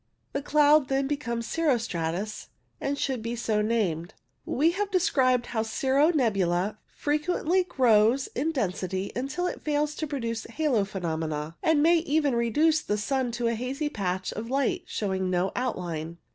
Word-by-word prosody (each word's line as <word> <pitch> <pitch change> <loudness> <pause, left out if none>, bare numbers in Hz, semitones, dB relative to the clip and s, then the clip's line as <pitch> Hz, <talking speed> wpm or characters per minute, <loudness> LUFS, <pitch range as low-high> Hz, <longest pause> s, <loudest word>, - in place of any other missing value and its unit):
The 280 - -1
cloud 295 -1 +4
then 270 0 +1
becomes 235 -5 -2
cirro 310 -1 +1
stratus, 185 -1 -3 0.3
and 280 +1 -2
should 260 -5 -1
be 230 +2 -3
so 220 -2 0
named. 195 -7 -1 0.3
We 310 +6 +3
have 400 +3 -2
described 265 -11 +2
how 225 -2 -2
cirro 265 +7 +2
nebula 200 - +1
frequently 325 +4 0
grows 245 -4 +3
in 305 +6 0
density 190 - -2
until 275 +8 -2
it - - -3
fails 300 0 0
to 310 - -2
produce 230 -6 -3
halo 245 -5 0
phenomena, 160 -4 -3
and 310 -2 +3
may 340 +2 +5
even 305 -4 +1
reduce 300 +7 +2
the 210 - -1
sun 255 +3 -1
to 240 0 -2
a 230 - +2
hazy 260 +6 -2
patch 185 -5 -2
of 225 +2 -6
light 280 +7 0
showing 190 -3 -2
no 185 +1 +1
outline. 170 -9 -3
245 Hz, 160 wpm, -27 LUFS, 205-295 Hz, 0.3 s, may